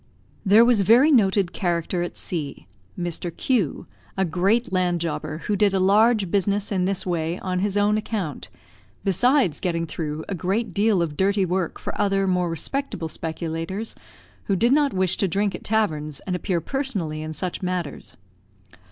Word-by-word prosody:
There 215 +3 +6
was 235 -4 +4
very 240 - +6
noted 195 - +3
character 175 0 -1
at 175 - -4
C, 145 - -4 0.3
Mr. 175 0 -3
Q, 225 - 0 0.3
a 190 - +2
great 190 +7 +1
land 180 -2 +1
jobber, 155 -1 -4
who 210 - +1
did 200 -1 +3
a - - +2
large 205 0 +3
business 200 +1 +1
in 185 -2 +1
this 195 0 -1
way 170 -1 -1
on 185 -1 -2
his 205 +1 0
own 210 +1 +3
account, 200 - -4 0.5
besides 200 - +2
getting 170 -3 -1
through 155 -1 -4
a - - -3
great 190 +4 -1
deal 205 -2 +3
of 155 -3 -4
dirty 195 +2 +2
work 180 -1 -1
for - - -6
other 195 -1 +2
more 180 -2 +1
respectable 170 - -3
speculators, 165 +6 -4 0.5
who 195 - +1
did 235 +6 +3
not 290 -1 +3
wish 185 -1 +1
to 195 - +1
drink 200 +3 0
at - - -7
taverns 155 -10 -1
and 185 - -3
appear 180 -1 -1
personally 195 - -3
in 155 0 -5
such 180 +3 -4
matters. 180 -5 -4
190 Hz, 170 wpm, -23 LUFS, 170-205 Hz, 0.5 s, There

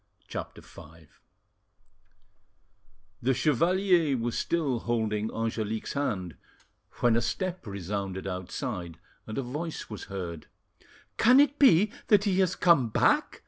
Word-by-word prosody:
CHAPTER - - -7
V - - -14 2.4
The 130 +2 +1
chevalier 165 +2 +2
was 120 0 -2
still 145 -8 0
holding 110 -2 -1
Angelique's 110 -1 -3
hand 95 - -3 0.6
when 120 -2 +4
a 115 - +2
step 180 - -3
resounded 100 -1 -4
outside, 90 - -5 0.3
and 110 - -6
a 135 - -1
voice 150 +3 -5
was 105 - -7
heard. 90 -5 -6 0.7
"Can 250 +4 +6
it 290 0 +3
be 210 - +5 0.2
that 205 -2 +5
he 195 -2 +1
has 185 -2 +2
come 150 -10 +4
back?" - - +2
120 Hz, 120 wpm, -28 LUFS, 105-170 Hz, 2.4 s, Can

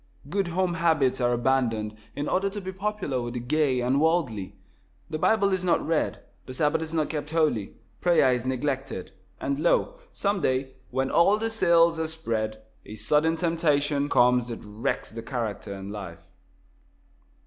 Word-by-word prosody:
Good 195 -1 0
home 180 +1 0
habits 160 -6 +2
are 120 0 +3
abandoned 120 -3 +1 0.2
in 145 +1 -3
order 195 +2 +1
to 205 +1 -6
be 190 -1 -5
popular 190 -9 -2
with 120 0 -5
the - - -1
gay 130 0 +1
and 130 +4 +2
worldly. 145 - 0 0.6
The 155 - -2
Bible 200 +1 +3
is 185 -1 -1
not 180 - +2
read, 160 0 -1 0.2
the 130 - -7
Sabbath 150 +3 +1
is 160 -1 -5
not 160 -2 0
kept 150 -1 -4
holy, 155 -11 0 0.2
prayer 170 -7 +4
is 125 -2 -1
neglected, 130 -5 -3 0.3
and 140 +1 -2
lo! 175 - +1
some 200 -1 -1
day, 130 +1 0 0.2
when 130 +1 -1
all 195 +5 +5
the 225 +1 -2
sails 170 -5 +4
are 160 - 0
spread, 110 -9 -3 0.2
a 105 - -9
sudden 150 +9 +2
temptation 150 -4 +1
comes 125 -1 +4
that 115 -2 -7
wrecks 105 +3 -3
the 115 +1 -6
character 110 -4 -4
and 100 0 -6
life. 85 -5 -8
145 Hz, 170 wpm, -26 LUFS, 120-170 Hz, 0.6 s, all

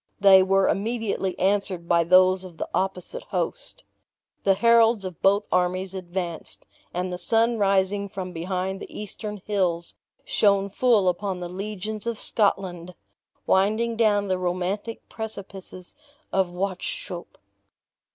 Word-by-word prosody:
They 195 -1 +8
were 195 +1 +3
immediately 210 -3 -1
answered 190 -3 0
by 170 -1 +4
those 185 +1 +5
of 180 -3 -11
the - - -3
opposite 190 - -2
host. - - -4 0.6
The 195 -1 +5
heralds 230 -1 +4
of 185 -3 -7
both 200 +2 +4
armies 185 +1 0
advanced, 175 -2 -5 0.3
and 180 +1 -3
the 180 - -5
sun 230 +2 +2
rising 200 0 +2
from 185 -2 -6
behind 185 +3 -3
the - - -9
eastern 210 -1 -6
hills, 180 -5 -1 0.3
shone 200 -1 +2
full 220 -3 +3
upon 185 +1 -1
the 175 -1 -5
legions 210 +3 -5
of 235 -2 -2
Scotland, 180 -4 0 0.5
winding 215 +5 +2
down 210 -3 +2
the 185 -1 0
romantic 185 +5 -3
precipices 195 -4 -8 0.4
of 190 -2 +2
Wauchope. 180 -1 -5
195 Hz, 130 wpm, -25 LUFS, 180-205 Hz, 0.6 s, They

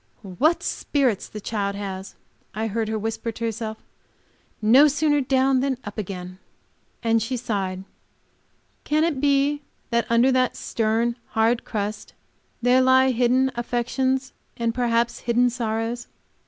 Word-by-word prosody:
"What 255 - +1
spirits 260 -9 0
the 210 - -7
child 200 -1 -2
has!" 195 -1 -6 0.4
I 220 +1 -1
heard 225 +1 -1
her 220 0 -1
whisper 225 +2 -3
to 230 - -4
herself; 220 -1 -3 0.8
"no 250 +7 +6
sooner 295 0 +2
down 265 0 +2
than 265 -1 0
up 205 +1 -7
again." 185 -2 -6 0.6
And 230 -1 +2
she 250 +4 -2
sighed. 195 -5 -3 1.0
Can 305 +1 +1
it 310 -5 0
be 285 0 +2 0.3
that 235 0 +1
under 235 +3 +4
that 255 -1 +2
stern 225 +1 0
and 235 - -5 0.2
hard 230 +2 +2
crust 210 -1 -4 0.5
there 250 +1 +5
lie 260 0 +5
hidden 255 +2 +2
affections 260 +3 -1 0.2
and 230 -1 0
perhaps 235 -1 0
hidden 245 +1 +2
sorrows? 230 0 -3
235 Hz, 140 wpm, -24 LUFS, 220-260 Hz, 1.0 s, no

